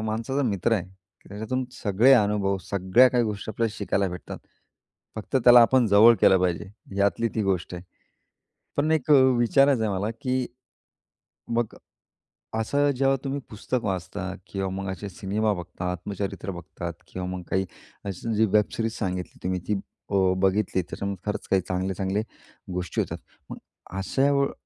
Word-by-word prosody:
माणसाचा 115 +6 -2
मित्र 100 +3 0
आहे. 95 -5 0 0.4
त्याच्यातून 110 +6 -3
सगळे 110 +4 +3
अनुभव, 100 -4 +2
सगळ्या 100 +6 +5
काही 120 -2 +2
गोष्टी 105 0 -4
आपल्याला 110 0 -1
शिकायला 100 -1 0
भेटतात, 90 0 -7 0.8
फक्त 110 +5 -2
त्याला 120 0 +9
आपण 125 0 +4
जवळ 110 +3 +7
केलं 95 - +6
पाहिजे. 90 +2 -1 0.3
यातली 100 +3 +2
ती 110 - 0
गोष्ट 95 -2 -1
आहे. 90 - -7 0.9
पण 150 +2 +1
एक 155 -1 0
अ, - - +9 0.2
विचारायचं 135 +1 +4
आहे 110 - 0
मला 105 +3 -1
की 130 -1 0 1.1
मग 120 -2 -1 0.8
असं 145 +6 +1
जेव्हा 135 0 +3
तुम्ही 140 +1 -2
पुस्तक 115 +3 -3
वाचता 95 0 -3
किंवा 95 -1 -3
मग 95 +1 -4
असे 100 +2 -6
सिनेमा 105 +4 -1
बघता, 90 0 -5
आत्मचरित्र 100 +2 -4
बघतात 85 -1 -7
किंवा 90 0 -5
मग 90 0 -4
काही 95 0 +1 0.4
अशी 100 +4 -3
जी 110 +1 +4
वेबसिरीज 110 +1 +1
सांगितली 90 -3 -3
तुम्ही 90 0 -1
ती 105 - +1 0.3
अ, 100 - -1 0.2
बघितली 95 0 +1
त्याच्यामधून 100 +3 -5
खरंच 105 - -3
काही 95 -1 +4
चांगले-चांगले 95 +2 -1 0.5
गोष्टी 90 -3 -2
होतात. - - -4 0.3
मग - - -7 0.4
अशा 135 +8 +1
वेळी 140 0 +2
100 Hz, 150 wpm, -25 LUFS, 95-115 Hz, 1.1 s, त्याला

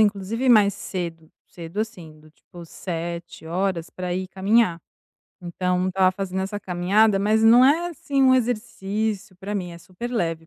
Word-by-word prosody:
inclusive 215 +4 +1
mais 210 -4 +6
cedo, 170 -5 -6 0.2
cedo, 170 +4 -6
assim, 170 -9 -7
do 155 0 -19
tipo 170 +2 -14
7h 170 +1 -4
pra 180 -1 -4
ir 185 0 -3
caminhar. 195 -2 +2 0.6
Então, 180 +1 -1
estava 185 0 +3
fazendo 190 0 -3
essa 205 +2 -4
caminhada, 195 +4 +2
mas 215 +2 +2
não 235 +3 +7
é, 330 +6 +3
assim, 280 -4 -1
um 260 -1 +6
exercício 215 -4 -2
pra 200 +3 -6
mim, 180 -3 -4
é 170 - -10
super 185 +8 -8
leve 165 -8 -2
190 Hz, 155 wpm, -23 LUFS, 175-220 Hz, 0.6 s, não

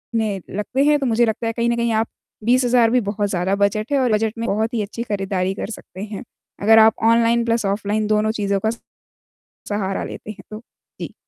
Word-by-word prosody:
में 210 -4 -1
लगते 210 +7 -1
हैं, 295 0 +4
तो 275 - -2
मुझे 240 -1 +3
लगता 225 +1 -2
है, 225 - -1
कहीं 235 +1 0
न 235 - +1
कहीं 235 0 0
आप 220 +1 +1 0.4
20,000 245 -1 +3
भी 250 0 +3
बहुत 205 0 -2
ज़्यादा 185 +1 0
बजट 205 +4 0
है, 280 - +3
और 250 -3 +1
बजट 215 0 +1
में 230 - -3
बहुत 220 +3 -1
ही 225 - 0
अच्छी 225 +3 -5
खरीदारी 195 -3 -2
कर - - -5
सकते 190 -2 -10
हैं, 210 -2 -7 0.4
अगर 220 +2 +6
आप 220 0 +6 0.2
ऑनलाइन 235 0 +3
प्लस 230 -2 0
ऑफ़लाइन 205 +1 -1
दोनों 215 0 +2
चीज़ों 200 -1 +1
का - - +3 1.0
सहारा 200 -2 -2
लेते 215 - -7
हैं 195 -2 -12
तो। 215 - -6 0.4
जी। - - -6
220 Hz, 215 wpm, -21 LUFS, 200-235 Hz, 1.0 s, अगर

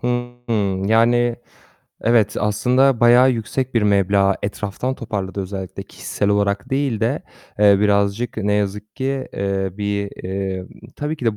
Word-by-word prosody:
Hıı. 120 -6 -2
Yani, 120 +2 +3 0.6
evet, 110 -2 +2
aslında 125 +5 +2
bayağı 120 +2 +6
yüksek 125 +2 -3
bir 115 - +3
meblağ 100 -1 +3
etraftan 105 +5 -3
toparladığı 100 -5 -4
özellikle, 95 -1 -6
kişisel 100 - -3
olarak 100 +1 0
değil 135 -5 0
de - - 0 0.4
eee, 100 -1 +6
birazcık 100 +3 +1
ne 105 -1 0
yazık 105 +1 -2
ki, 135 0 -2
eee, 95 -1 -1
bir, 100 0 -2
eee 95 -1 -3 0.3
Tabii 150 +2 -3
ki 125 - -7
de 110 -2 +1
105 Hz, 135 wpm, -20 LUFS, 100-120 Hz, 0.6 s, bayağı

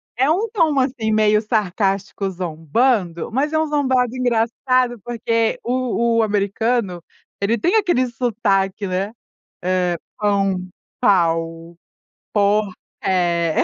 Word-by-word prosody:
é 260 +4 +2
um 380 +8 +1
tom 315 -9 +2
assim 255 -4 0
meio 215 0 +3
sarcástico, 195 -2 -1
zombando, 175 - -1
mas 275 +6 0
é 315 - +3
um 315 - +1
zombado 260 -5 +1
engraçado, 245 0 +1
porque 230 -1 0
o 235 -2 0
o 225 - +4
americano, 205 -2 0 0.4
ele 215 +4 +1
tem 350 - +1
aquele 350 - +2
sotaque, 210 -5 0
né? 190 +3 -2 0.5
Eh, 180 -1 +1 0.2
pão, 195 -3 0 0.3
pau, 165 -2 +1 0.6
pó 205 0 +2 0.3
é. 170 -3 +1
215 Hz, 115 wpm, -20 LUFS, 190-250 Hz, 0.6 s, o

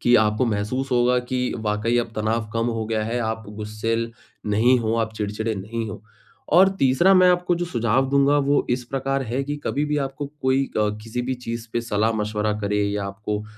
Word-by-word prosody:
कि 120 - +4
आपको 110 +2 +2
महसूस 115 +5 -2
होगा 125 0 +3
कि 125 -1 -1
वाक़ई 110 +2 0
अब 120 - 0
तनाव 110 0 -1
कम 115 0 0
हो 115 -2 -1
गया 110 -1 -1
है, 115 +3 -2
आप 110 -1 -3
गुस्सैल 110 +2 -3 0.3
नहीं 115 +5 +4
हो, 110 0 0
आप 110 -1 -1
चिड़चिड़े 110 +1 -2
नहीं 110 +3 -4
हो। 100 - -9 0.5
और 190 +2 +8
तीसरा 135 +9 +4
मैं 185 -1 +6
आपको 180 0 +2
जो - - +1
सुझाव 120 -2 +1
दूँगा, 140 +1 +4
वो 145 0 +2
इस 125 0 0
प्रकार 135 0 -1
है 130 +3 0
कि 145 +1 -3
कभी 145 +2 0
भी 150 0 -1
आपको 135 +1 -3 0.2
कोई 130 +1 +2
अ, 105 0 +3
किसी 115 +2 -4
भी 130 +1 -2
चीज़ 115 -1 -6
पे 120 - 0
सलाह-मशवरा 105 -1 0
करे 105 0 0
या 100 0 -2
आपको 105 +1 -4
अ - - -11
115 Hz, 205 wpm, -23 LUFS, 110-130 Hz, 0.5 s, और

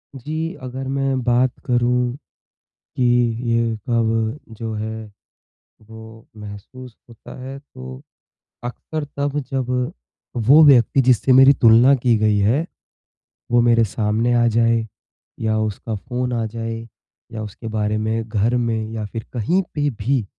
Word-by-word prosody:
जी, 155 +6 -4
अगर 130 +1 -6
मैं 135 -1 -1
बात 125 +1 +2
करूँ, 125 0 +1 0.8
कि 130 - 0 0.5
ये 115 -1 +1
कब 115 +1 0 0.2
जो 110 0 -5
है, 110 +1 -5 0.8
वो 110 +1 -13
महसूस 105 +4 -10
होता 115 - -13
है 135 +1 -7
तो 65 - -11 0.6
अक्सर 150 +5 -5
तब 145 +1 -1
जब 130 -2 -2 0.8
वो 150 +5 +8
व्यक्ति 135 -1 +5
जिससे 130 +1 +3
मेरी 135 +2 +8
तुलना 120 +1 +6
की 120 -3 +2
गई 105 -1 +2
है, 120 +11 +2 0.8
वो 120 0 +4
मेरे 115 -1 +4
सामने 110 +3 0
आ 120 0 +3
जाए 115 0 +2 0.5
या 110 -1 0
उसका 110 +1 -3
फ़ोन 125 +4 -4
आ 115 -2 -1
जाए 115 +1 -5 0.6
या 110 -1 -5
उसके 110 +2 -8
बारे 105 -1 -1
में 110 +1 -2
घर 110 +3 +1
में 115 -2 -1
या 110 -1 -4
फिर 110 +2 -7
कहीं 150 - +1
पे 145 -1 0
भी 120 +1 -1
115 Hz, 140 wpm, -20 LUFS, 110-130 Hz, 0.8 s, वो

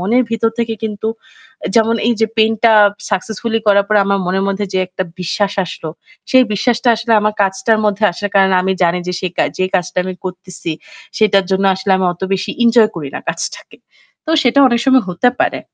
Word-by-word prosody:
মনের 230 +8 +2
ভিতর 225 0 0
থেকে 230 -1 -1
কিন্তু 215 0 -3 0.5
অ্যা - - -4
যেমন 225 0 +3
এই 240 - +3
যে 220 - +3
পেইন্টটা 225 +1 +3 0.4
successfully 220 +3 -2
করার 200 -1 +4
পরে 210 -1 +4
আমার 200 0 +1
মনের 190 +2 0
মধ্যে, 200 +1 -2
যে 190 - +1
একটা 185 +1 -4 0.2
বিশ্বাস 195 +3 -1
আসলো 165 -1 -7 0.4
সেই 260 -1 +6
বিশ্বাসটা 240 +3 +1
আসলে 230 +1 -3
আমার 215 0 0
কাজটার 195 +3 0
মধ্যে 210 +1 -1
আসার 205 +4 -5
কারণ 195 -1 +4
আমি 190 - 0
জানি 175 +1 +1
যে 180 - -2
সে 185 - -1
কা - - +3
যেই 185 0 0
কাজটা 180 0 -3
আমি 185 - -4
করতেছি 180 -2 -6 0.5
সেটার 200 -3 +3
জন্য 190 +1 +1
আসলে 190 +1 -2
আমি 190 - 0
অত 175 - -21
বেশি 190 - -3
এনজয় 230 -2 +5
করি 150 -5 -5
না - - -3
কাজটাকে। - - -6 0.5
তো 315 - -2
সেটা 250 +2 +3
অনেক 240 -2 +1
সময় 260 -2 +4
হতে 180 +8 +2
পারে। - - 0
205 Hz, 200 wpm, -16 LUFS, 185-225 Hz, 0.5 s, সেই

